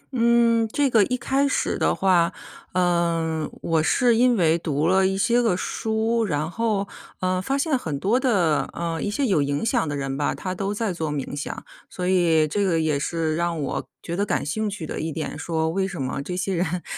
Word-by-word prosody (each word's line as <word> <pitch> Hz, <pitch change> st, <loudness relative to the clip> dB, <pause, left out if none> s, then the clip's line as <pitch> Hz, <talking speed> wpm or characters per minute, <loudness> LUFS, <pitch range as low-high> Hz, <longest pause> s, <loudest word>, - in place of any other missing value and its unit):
嗯， 235 Hz, -1 st, +3 dB
这 280 Hz, -3 st, +1 dB
个 220 Hz, -3 st, +5 dB
一 250 Hz, -, -1 dB
开 275 Hz, +3 st, +1 dB
始 -, -, 0 dB
的 -, -, +2 dB
话， 180 Hz, -2 st, +3 dB, 0.4 s
呃， 170 Hz, -3 st, +1 dB
我 165 Hz, -1 st, +2 dB
是 240 Hz, +7 st, +3 dB
因 245 Hz, -1 st, +4 dB
为 165 Hz, -1 st, +3 dB
读 150 Hz, -1 st, -1 dB
了 190 Hz, +1 st, +4 dB
一 195 Hz, 0 st, -1 dB
些 240 Hz, +4 st, +3 dB
个 215 Hz, -7 st, +1 dB
书， 225 Hz, +3 st, -1 dB
然 155 Hz, -3 st, -1 dB
后， 215 Hz, -3 st, -1 dB, 0.3 s
呃， 185 Hz, 0 st, 0 dB
发 270 Hz, +7 st, -1 dB
现 295 Hz, 0 st, +1 dB
很 160 Hz, -, -3 dB
多 215 Hz, -, +2 dB
的， 190 Hz, -, +1 dB
呃， 165 Hz, -1 st, -3 dB
一 205 Hz, -, -1 dB
些 275 Hz, +7 st, 0 dB
有 190 Hz, -, +2 dB
影 140 Hz, +7 st, -1 dB
响 235 Hz, -, +1 dB
的 145 Hz, -, -2 dB
人 135 Hz, -1 st, -3 dB
吧， 145 Hz, +1 st, -1 dB
他 185 Hz, -1 st, -4 dB
都 195 Hz, +2 st, -2 dB
在 210 Hz, -2 st, -1 dB
做 160 Hz, -3 st, -3 dB
冥 145 Hz, -1 st, -4 dB
想。 145 Hz, -, -6 dB, 0.2 s
所 180 Hz, -1 st, -4 dB
以 170 Hz, -4 st, +3 dB
这 200 Hz, +7 st, -1 dB
个 170 Hz, -4 st, +2 dB
也 155 Hz, -3 st, +1 dB
是 160 Hz, 0 st, -1 dB
让 170 Hz, -1 st, -1 dB
我 140 Hz, -, -3 dB, 0.2 s
觉 170 Hz, -, -4 dB
得 200 Hz, -, 0 dB
感 205 Hz, -, -1 dB
兴 215 Hz, +8 st, -1 dB
趣 195 Hz, -6 st, -6 dB
的 -, -, -5 dB
一 160 Hz, +1 st, -3 dB
点， 155 Hz, -1 st, -4 dB
说 160 Hz, -1 st, -1 dB
为 190 Hz, +2 st, 0 dB
什 185 Hz, -6 st, -7 dB
么 135 Hz, +1 st, -2 dB
这 180 Hz, +5 st, -5 dB
些 195 Hz, +1 st, -1 dB
人， 175 Hz, 0 st, -1 dB
180 Hz, 230 characters per minute, -24 LUFS, 160-220 Hz, 0.4 s, 个